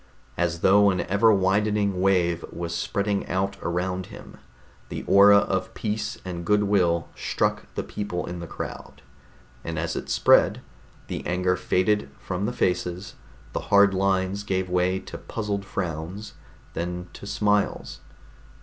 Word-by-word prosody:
As 85 -1 -1
though 100 +1 +6
an 95 -2 0
ever 105 +4 +3
widening 100 0 +1
wave 90 -3 +2
was 85 0 -5
spreading 100 +3 -1
out 95 +1 -1
around 90 +1 -2
him, - - -12 0.5
the - - -5
aura 100 +1 +7
of 95 -2 -1
peace 105 0 -3
and 85 -2 -5
good 105 +4 +3
will 90 -5 +1
struck - - -1
the - - -2
people 100 -4 -4
in 90 0 -6
the 85 - -7
crowd. - - -8 0.6
And 80 -1 -4
as 85 +1 -2
it - - -5
spread, - - +4 0.4
the - - -5
anger 90 +1 +1
faded 95 -1 +1
from 95 +2 -3
the - - -1
faces; 90 -2 -1 0.4
the - - -1
hard 100 -1 +6
lines 95 +1 0
gave 95 -3 -2
way 90 +1 +2
to - - -9
puzzled 105 -3 -3
frowns, 90 +2 -5 0.4
then 90 +1 -4
to 100 - -10
smiles. 105 0 0
95 Hz, 145 wpm, -25 LUFS, 90-100 Hz, 0.6 s, aura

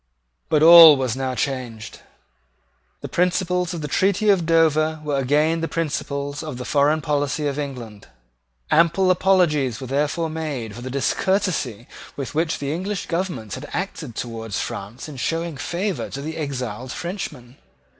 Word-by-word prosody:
But 155 -1 +3
all 165 -3 +10
was 130 -3 -1
now 130 -1 -2
changed. 125 -5 -4 1.0
The - - -5
principles 180 0 0
of 170 - -5
the 150 - -3
treaty 200 +7 +1
of 175 -5 +1
Dover 160 -1 +3
were 145 -2 -1
again 150 +5 +2
the 165 - -1
principles 145 -3 -3
of 155 -5 -6
the 125 - -6
foreign 150 +2 +2
policy 145 0 -1
of 145 0 -2
England. 120 -8 -7 0.6
Ample 170 +3 +4
apologies 165 - +2
were 135 - -6
therefore 150 +5 -1
made 150 -9 -4
for 120 - -9
the 130 - -6
discourtesy 140 - -1 0.3
with 140 -2 -5
which 160 +1 0
the 140 +1 -3
English 190 +4 -3
government 170 - -3
had 135 +3 -7
acted 165 - -4
towards 115 -3 -4
France 105 +9 -6
in 150 -3 -9
showing 165 +5 -2
favour 175 +8 -3
to 150 +4 -6
exiled 130 -5 -4
Frenchmen. 145 -7 -6
150 Hz, 150 wpm, -22 LUFS, 130-165 Hz, 1.0 s, all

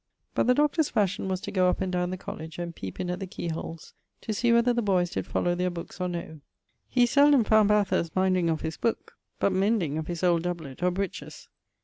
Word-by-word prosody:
But - - +1
the 250 - +5
Doctor's 300 +2 +2
fashion 200 -3 0
was 185 -1 -1
to - - -6
goe 185 -2 +3
up - - -1
and 190 -1 -1
down 180 -1 0
the 185 - -4
college, 160 -2 -8
and 170 -1 -5
peepe 95 -1 -7
in 180 -1 -2
at 180 - -4
the 195 - -5
key 175 -3 -5
holes 165 0 -6 0.3
to 220 - -3
see 235 +3 +2
whether 235 +1 +4
the 240 - 0
boyes 185 -4 +1
did - - -3
follow 175 - 0
their 180 +1 0
books 175 +1 -8
or 180 - 0
no. 170 -3 -6 0.5
He 245 -1 +4
seldome 285 0 +5
found 215 -1 +4
Bathurst 200 -5 +1
minding 185 -2 +2
of 160 -1 -1
his 160 0 -4
booke, 230 - -2 0.2
but 200 - +2
mending 190 -6 +1
of 160 - -5
his 175 0 -4
old 175 -2 +3
doublet 165 -6 -5
or 180 - +3
breeches. 190 +1 -5
180 Hz, 235 wpm, -27 LUFS, 170-210 Hz, 0.5 s, the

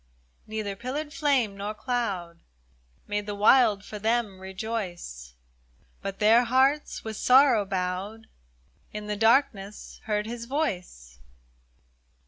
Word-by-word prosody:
Neither 215 -2 -4
pillared 285 +7 -5
flame 265 -10 +1
nor 205 +2 -5
cloud 200 -10 -3 0.7
Made 205 0 -3
the 205 - -3
wild, 210 -1 +4
for 210 - -7
them, 220 -3 0
rejoice, 185 - -6 0.7
But 195 0 -5
their 225 +3 +5
hearts, 265 +5 +2
with 220 -2 -5
sorrow 255 -5 +5
bowed. 190 +3 -3 0.7
In 210 0 -6
the 210 0 -2
darkness 220 -3 +1
heard 210 -1 -1
His 235 +1 -6
voice. 180 - -4
210 Hz, 110 wpm, -27 LUFS, 195-240 Hz, 0.7 s, their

